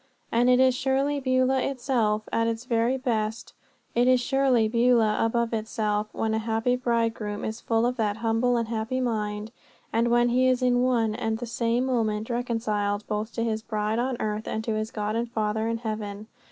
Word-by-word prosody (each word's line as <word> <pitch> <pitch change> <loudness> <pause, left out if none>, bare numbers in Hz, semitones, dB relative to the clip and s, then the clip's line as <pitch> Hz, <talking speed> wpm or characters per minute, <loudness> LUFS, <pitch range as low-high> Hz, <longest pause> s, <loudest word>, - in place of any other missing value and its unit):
And 240 +2 +3
it 250 0 +5
is 260 0 +5
surely 270 +3 0
Beulah 255 0 +2
itself, 240 -6 0
at 230 0 +2
its 230 +1 -3
very 235 +1 +1
best, 225 -4 -2 0.4
it 240 +1 +3
is 255 0 +5
surely 255 -3 +2
Beulah 230 -2 +3
above 235 +1 0
itself, 215 -1 -1
when 220 -1 -1
a 220 - +1
happy 225 +2 0
bridegroom 230 -4 -1
is 220 +2 -5
full 225 0 +1
of 250 +1 -1
that 210 -2 0
humble 230 +2 +1
and 230 -1 -1
happy 225 +3 -2
mind, 215 -3 -2 0.4
and 230 +1 +2
when 240 0 +3
he 255 +2 +3
is 255 0 +2
in 245 -1 +3
one 235 -4 +2
and 220 0 -2
the 240 - -5
same 235 +1 0
moment 225 -3 -1
reconciled 215 -4 -1
both 215 +1 -2
to 230 - -1
his 220 -1 -1
bride 215 0 -2
on 250 0 -1
earth 215 0 -3
and 220 - -2
to 225 - -1
his 215 0 -2
God 210 0 -3
and 235 +1 -1
Father 220 0 -1
in 230 0 -1
heaven. 215 -2 -5
230 Hz, 195 wpm, -26 LUFS, 220-245 Hz, 0.4 s, it